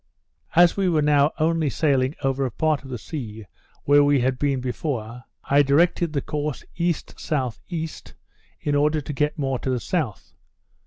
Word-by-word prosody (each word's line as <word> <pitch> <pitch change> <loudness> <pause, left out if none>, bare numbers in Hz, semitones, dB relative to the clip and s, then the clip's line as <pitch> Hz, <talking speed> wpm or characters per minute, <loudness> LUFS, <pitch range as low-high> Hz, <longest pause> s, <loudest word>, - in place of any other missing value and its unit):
As 175 0 +6
we 195 -2 +1
were 155 -3 +2
now 145 0 +4
only 160 -1 +1
sailing 135 -1 +1
over 135 0 +1
a 130 - 0
part 155 +4 0
of 135 - -11
the 125 - -4
sea 110 -5 -7 0.4
where 145 0 +5
we 145 -1 +4
had 130 0 0
been 140 -2 +1
before, 125 -2 -4 0.2
I 140 +1 +4
directed 160 +4 +2
the 140 - -1
course 150 -2 -3
E.S.E. 160 -2 -3 0.6
in 145 - -1
order 150 +2 +2
to 150 +1 -6
get 150 +3 0
more 135 -3 -1
to - - -3
the 125 -1 0
south. 135 - -3
145 Hz, 165 wpm, -23 LUFS, 130-155 Hz, 0.6 s, As